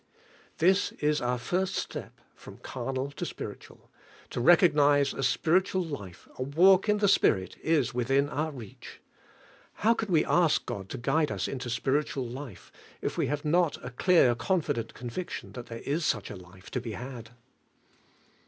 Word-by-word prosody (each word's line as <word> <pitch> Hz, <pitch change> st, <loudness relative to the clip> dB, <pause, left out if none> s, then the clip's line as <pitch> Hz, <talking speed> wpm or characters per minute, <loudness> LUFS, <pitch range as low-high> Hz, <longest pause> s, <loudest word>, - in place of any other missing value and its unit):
This 185 Hz, +4 st, +3 dB
is 150 Hz, 0 st, 0 dB
our 125 Hz, 0 st, 0 dB
first 185 Hz, +9 st, -1 dB
step -, -, -5 dB
from -, -, -13 dB
carnal 135 Hz, +1 st, -4 dB
to -, -, -6 dB
spiritual, -, -, -8 dB, 0.2 s
— -, -, -24 dB
to 120 Hz, -, -2 dB
recognize 145 Hz, -3 st, +5 dB
a -, -, -5 dB
spiritual 185 Hz, +7 st, +2 dB
life, 100 Hz, -, -8 dB
a -, -, -3 dB
walk 185 Hz, +9 st, +4 dB
in 210 Hz, -, +4 dB
the 205 Hz, -1 st, +2 dB
Spirit, 95 Hz, -, +2 dB
is 145 Hz, -6 st, +1 dB
within 135 Hz, +4 st, +1 dB
our 150 Hz, +2 st, -2 dB
reach. 120 Hz, -9 st, -11 dB, 0.9 s
How 230 Hz, -, +6 dB
can 220 Hz, -3 st, -4 dB
we 160 Hz, -3 st, +4 dB
ask 170 Hz, -3 st, +2 dB
God 95 Hz, -1 st, -6 dB
to -, -, -5 dB
guide 150 Hz, +4 st, +1 dB
us 95 Hz, -2 st, -2 dB
into 125 Hz, -2 st, -5 dB
spiritual 135 Hz, +2 st, -1 dB
life, 125 Hz, -4 st, -9 dB, 0.3 s
if -, -, -2 dB
we -, -, 0 dB
have 145 Hz, +1 st, -3 dB
not 170 Hz, +1 st, +2 dB
a 125 Hz, -, -6 dB
clear, 130 Hz, -1 st, +4 dB
confident 130 Hz, -, -1 dB
conviction 125 Hz, +9 st, -6 dB
that 125 Hz, -2 st, -8 dB
there 115 Hz, 0 st, -7 dB
is 155 Hz, +4 st, -1 dB
such 110 Hz, -9 st, -1 dB
a -, -, -6 dB
life 90 Hz, +1 st, -14 dB
to 125 Hz, -, -2 dB
be 115 Hz, -2 st, -6 dB
had? 120 Hz, -1 st, -8 dB
140 Hz, 170 wpm, -28 LUFS, 120-170 Hz, 0.9 s, How